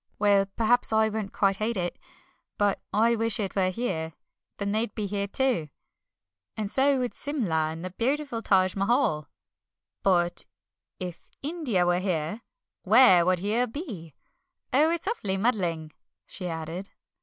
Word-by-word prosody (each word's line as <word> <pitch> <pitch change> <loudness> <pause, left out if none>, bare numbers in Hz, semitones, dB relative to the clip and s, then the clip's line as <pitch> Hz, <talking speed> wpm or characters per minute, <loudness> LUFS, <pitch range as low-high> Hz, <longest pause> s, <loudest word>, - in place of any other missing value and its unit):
Well, 200 -2 +3
perhaps 235 +2 +2
I 220 0 +3
won't 215 -2 -4
quite 195 -1 +1
hate 215 +1 -1
it, 175 -1 -3 0.6
but 205 -1 +1
I 230 +2 +3
wish 225 -1 +3
it 195 -3 -3
were 185 -2 +2
here, 165 -6 -3 0.4
then 200 0 -2
they'd 215 0 -1
be 215 - -2
here 200 0 -2
too, 235 - 0 0.9
and 210 -2 -2
so 275 +1 +3
would 250 -1 -2
Simla 185 - -1
and 165 +2 -7
the 185 - -5
beautiful 255 +3 -1
Taj 185 -3 +2
Mahal." 195 - +1 0.7
"But 175 -2 +1 0.5
if 180 -2 -6
India 280 - 0
were 175 0 +2
here, 180 +2 -2 0.4
where 205 -4 +6
would 185 0 +3
Here 215 +7 0
be? 220 - -7 0.6
Oh, 300 +5 +5
it's 340 +2 -2
awfully 205 - -1
muddling," 175 -8 0 0.3
she 180 - -6
added. 165 +3 -5
200 Hz, 145 wpm, -27 LUFS, 180-235 Hz, 0.9 s, where